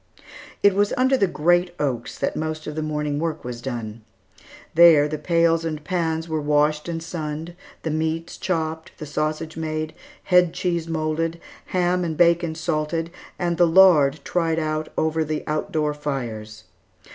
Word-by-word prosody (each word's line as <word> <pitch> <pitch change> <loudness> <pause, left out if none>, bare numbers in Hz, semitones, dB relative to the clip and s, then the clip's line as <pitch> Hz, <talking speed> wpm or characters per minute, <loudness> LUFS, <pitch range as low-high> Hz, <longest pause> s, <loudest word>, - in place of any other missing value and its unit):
It 200 - +6
was 205 +1 +1
under 260 +1 +4
the 200 -7 +2
great 175 +2 +2
oaks 130 -5 -2
that - - -1
most 155 0 -3
of 150 - -5
the 155 - -3
morning 150 -1 -2
work 160 -1 -3
was 120 -1 -6
done. 115 -3 -5 0.7
There 160 -3 +7
the 150 0 -4
pails 165 -1 +2
and 155 -2 -4
pans 165 -1 -1
were 160 -1 -2
washed 150 +2 +1
and 165 -1 -4
sunned, 160 0 -5 0.3
the 160 - -1
meats 160 +2 -2
chopped, 160 -3 -2
the 155 - -7
sausage 155 +2 -3
made, 155 -1 -3 0.3
head 180 -2 +4
cheese 175 -3 -1
moulded, 165 +1 -1 0.3
ham 180 0 +1
and 160 -3 -3
bacon 170 -1 +3
salted, 165 0 -2 0.3
and 175 -1 -1
the 175 - +6
lard 160 -5 +5
tried 165 -2 0
out 155 -1 -2
over 160 0 +1
the 155 0 -3
out 155 0 -2
door 150 -1 0
fires. 115 -7 -5
160 Hz, 160 wpm, -23 LUFS, 150-170 Hz, 0.7 s, There